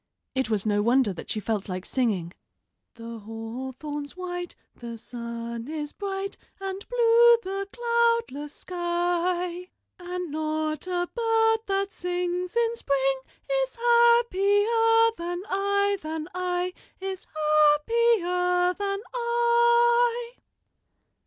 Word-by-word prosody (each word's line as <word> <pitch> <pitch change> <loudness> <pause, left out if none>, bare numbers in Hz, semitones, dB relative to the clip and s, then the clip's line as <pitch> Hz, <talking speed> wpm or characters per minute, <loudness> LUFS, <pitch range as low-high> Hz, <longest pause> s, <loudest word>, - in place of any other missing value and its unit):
It 260 -3 -1
was 215 -2 0
no 205 -1 +2
wonder 235 -1 +3
that - - -9
she 220 - -1
felt 210 -2 -2
like 185 0 -4
singing: 200 -10 -1 0.6
"The 230 0 -8
hawthorn's 260 - -6
white, 355 -1 -5 0.2
the 235 -1 -8
sun 235 0 -6
is 300 -1 -5
bright, 395 -1 -4 0.2
And 390 0 -5
blue 470 0 +6
the 390 +1 -3
cloudless 465 - 0
sky; 350 +1 -2 0.3
And 355 -2 -5
not 310 +1 -2
a 355 -1 -1
bird 450 -1 +2
that 395 0 0
sings 360 +1 -3
in 470 0 +2
spring 270 - 0 0.4
Is - - -6
happier 455 -1 +4
than 350 +1 -4
I, 400 0 +1
than 310 0 -4
I, 360 0 -1 0.3
Is 380 -1 -5
happier 360 +4 +3
than 395 +1 -3
I." 475 0 +3
360 Hz, 110 wpm, -26 LUFS, 295-450 Hz, 0.6 s, blue